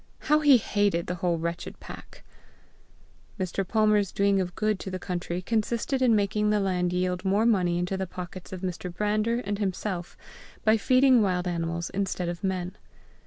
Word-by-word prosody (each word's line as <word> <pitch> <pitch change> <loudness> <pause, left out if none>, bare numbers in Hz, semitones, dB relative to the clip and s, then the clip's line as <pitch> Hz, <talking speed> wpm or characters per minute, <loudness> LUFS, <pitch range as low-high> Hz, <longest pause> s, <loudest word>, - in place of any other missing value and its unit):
How 300 +1 +3
he 290 -4 +7
hated 205 -6 0
the 180 - -3
whole 175 -1 0
wretched 170 +1 -5
pack! - - -12 1.2
Mr. 185 +1 -1
Palmer's 210 -2 +2
doing 200 -1 +2
of 180 -1 -4
good 215 -2 0
to - - -6
the 185 - -3
country 180 -1 -4
consisted 230 +5 -1
in 240 -3 +4
making 210 +1 +1
the 210 0 +2
land 180 -2 0
yield 180 0 -1
more 200 +3 +2
money 180 -7 +2
into 180 +2 -1
the 190 0 -3
pockets 180 +1 -8
of 185 -1 -6
Mr. 180 -1 -4
Brander 210 +5 0
and 205 -2 -3
himself 190 -2 -3 0.5
by 220 0 +6
feeding 255 +2 +4
wild 180 -3 0
animals 170 0 -2
instead 185 -2 -2
of 175 +3 -6
men. 185 -1 -2
190 Hz, 170 wpm, -27 LUFS, 180-210 Hz, 1.2 s, he